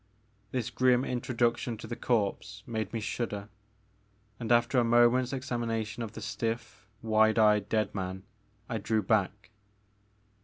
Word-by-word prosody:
This 125 +1 -3
grim 125 0 +3
introduction 120 -1 -1
to - - -9
the 120 - -5
corpse 100 -4 -1
made 110 -2 -3
me 115 - -2
shudder, 105 -2 -4 0.9
and, 115 -1 -3
after 120 +2 +4
a - - +3
moment's 120 +2 +4
examination 120 -4 -3
of 110 -2 -5
the 110 - -8
stiff, 115 -1 -4 0.2
wide 110 0 +3
eyed 105 -2 +4
dead 110 -2 0
man, 95 -1 -4 0.4
I 115 - -2
drew 105 +1 0
back. 100 0 0
115 Hz, 140 wpm, -30 LUFS, 105-120 Hz, 0.9 s, after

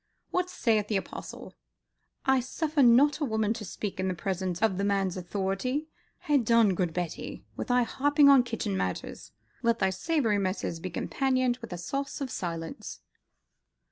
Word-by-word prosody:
What 365 0 0
saith 220 - +1
the 210 - +1
Apostle? 190 - -7 0.7
I 265 -1 +4
suffer 300 +4 -1
not 265 +5 +6
a - - -1
woman 220 -4 +1
to 225 - -7
speak 200 0 -5
in 185 -1 0
presence 185 -1 -2
of 210 -4 +1
the - - 0
man's 195 -2 +1
authority. 195 - -2 0.3
Ha' 295 -1 +2
done, 230 -3 +4
good 175 -1 0
Betty, 175 -1 -5
with - - -4
thy 245 0 +3
harping 290 +4 +3
on 275 -2 +8
kitchen 230 - -3
matters, 95 -1 -4 0.3
let 235 0 +2
thy 190 -3 +2
savoury 225 - +1
messes 185 -3 -2
be 185 - -5
companioned 255 +6 0
with 230 -4 -10
a 175 - -4
sauce 275 - -4
of 270 -3 -4
silence." 170 - -5
220 Hz, 165 wpm, -28 LUFS, 185-265 Hz, 0.7 s, on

